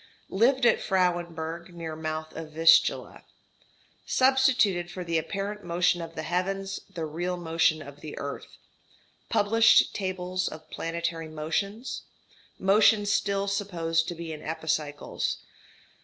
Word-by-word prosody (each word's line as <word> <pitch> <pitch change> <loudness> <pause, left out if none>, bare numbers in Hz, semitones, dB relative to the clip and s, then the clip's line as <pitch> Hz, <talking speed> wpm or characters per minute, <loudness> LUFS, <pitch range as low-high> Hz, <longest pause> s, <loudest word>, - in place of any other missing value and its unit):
Lived 245 +6 +3
at 235 - +4
Frauenburg 175 -2 -1
near 165 -2 -5
mouth 155 0 -5
of 160 -1 -7
Vistula. 165 +1 +4 0.8
Substituted 255 -9 +3
for 180 +1 -6
the 165 -1 0
apparent 200 +5 -4
motion 175 0 +1
of 165 - -8
the 155 - -4
heavens 195 +3 -2
the 165 -2 -4
real 175 +4 -3
motion 165 -2 +1
of 140 0 -12
the 150 - -8
earth. 140 0 -6 0.7
Published 225 +2 +5
tables 185 -1 -2
of 155 0 -9
planetary 165 -1 -3
motions. 180 - -3 0.6
Motion 205 +2 +4
still 200 -1 +1
supposed 170 -5 0
to 175 - -4
be 165 -1 -6
in 155 - -8
epicycles. 155 -2 -2
175 Hz, 125 wpm, -27 LUFS, 160-195 Hz, 0.8 s, Published